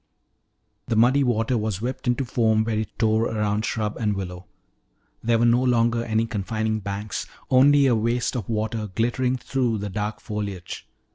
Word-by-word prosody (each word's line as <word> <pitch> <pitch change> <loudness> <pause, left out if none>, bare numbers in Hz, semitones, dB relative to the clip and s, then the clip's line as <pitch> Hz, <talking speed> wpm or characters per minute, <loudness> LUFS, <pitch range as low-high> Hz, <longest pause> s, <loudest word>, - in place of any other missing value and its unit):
The 115 - 0
muddy 125 +5 +4
water 120 -1 +1
was 105 -3 -2
whipped 125 +3 -4
into 125 +2 +1
foam 110 -2 +2
where 110 -1 -1
it 110 - -5
tore 110 0 +2
around 105 -1 -1
shrub 105 -2 -2
and 105 -3 0
willow. 90 -1 -6 0.7
There 115 0 +2
were 115 - +3
no 120 +1 +4
longer 120 -2 +2
any 110 0 0
confining 110 +1 -2
banks, 100 0 -4 0.2
only 140 +2 +6
a 130 - +4
waste 115 +3 0
of 115 -5 -4
water 110 0 -2
glittering 125 +3 +1
through 125 -2 -1
the 100 -1 -5
dark 105 +2 -3
foliage. 100 -4 -6
110 Hz, 165 wpm, -24 LUFS, 105-120 Hz, 0.7 s, only